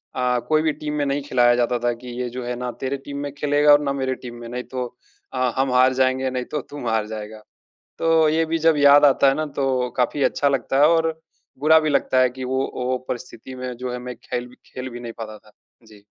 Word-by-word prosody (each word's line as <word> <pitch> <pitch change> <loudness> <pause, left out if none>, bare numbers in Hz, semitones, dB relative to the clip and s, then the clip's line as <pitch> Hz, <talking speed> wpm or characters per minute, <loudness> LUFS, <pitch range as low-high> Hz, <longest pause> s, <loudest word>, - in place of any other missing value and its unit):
अ, 125 -1 +1
कोई 155 0 +4
भी 155 - +1
टीम 150 0 -5
में 145 - 0
नहीं 140 +1 -1
खिलाया 120 -3 +3
जाता 120 0 +1
था 120 0 +1
कि, 120 +2 -12
ये 125 - -2
जो 125 +1 -6
है 125 0 -3
ना 125 0 -4
तेरे 135 +1 -2
टीम 140 0 -6
में 145 - -4
खेलेगा 145 0 +3
और 145 0 +7
ना 140 -1 -1
मेरे 130 -1 -2
टीम 120 -2 -9
में, 120 0 -9
नहीं 125 +1 -4
तो 125 -1 -4 0.5
अ, 130 -1 +1
हम 135 0 +1
हार 130 +1 +5
जाएँगे, 130 0 +1
नहीं 125 -1 -3
तो 150 - -2
तुम 145 -5 -6
हार 110 -1 0
जाएगा। 110 0 -7 0.6
तो 165 -1 +4
ये 160 +1 +2
भी 165 +1 -1
जब 160 - +4
याद 145 0 +7
आता 140 0 +4
है 135 - +5
ना 155 - -1
तो 130 -2 0
काफ़ी 130 +3 +1
अच्छा 145 - +1
लगता 135 0 -1
है 150 - +7
और 165 -1 +2 0.5
बुरा 160 +2 +6
भी 155 - -1
लगता 130 -2 +2
है 130 - +4
कि 130 +1 -8
वो 130 +1 -1
वो 125 0 -1
परिस्थिति 125 +1 -7
में 125 0 -5
जो 125 0 -4
है - - -3
मैं 125 0 -7
खेल 120 0 -4
भी 125 - -17
खेल 130 0 -7
भी 120 -1 -8
नहीं 120 -1 -7
पाता 110 -1 -7
था। 105 - -22 0.4
जी। 105 -2 -17
130 Hz, 250 wpm, -22 LUFS, 125-145 Hz, 0.6 s, और